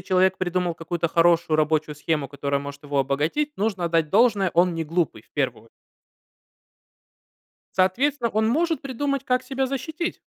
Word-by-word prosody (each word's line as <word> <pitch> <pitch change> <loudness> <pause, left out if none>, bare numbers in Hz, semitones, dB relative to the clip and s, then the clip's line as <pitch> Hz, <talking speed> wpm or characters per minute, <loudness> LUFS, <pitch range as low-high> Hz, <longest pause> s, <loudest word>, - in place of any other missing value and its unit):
человек 185 +1 +2
придумал 180 -1 -1
какую-то 170 +1 -2
хорошую 165 -1 +3
рабочую 155 0 +1
схему, 150 -1 -1
которая 140 +1 -2
может 140 0 -8
его 145 -1 -2
обогатить, 150 - 0
нужно 200 -3 -1
отдать 165 -2 +1
должное, 205 -4 +3
он 175 +1 +3
не 165 - -2
глупый, 165 +1 -1
в - - -33
первую - - -2
о - - -22 2.1
Соответственно, 235 +7 +2
он 220 +1 +1
может 325 +6 +1
придумать, 275 0 -2
как 255 -1 0
себя 265 +1 -2
защитить. 310 +6 -4
180 Hz, 150 wpm, -24 LUFS, 155-250 Hz, 2.1 s, хорошую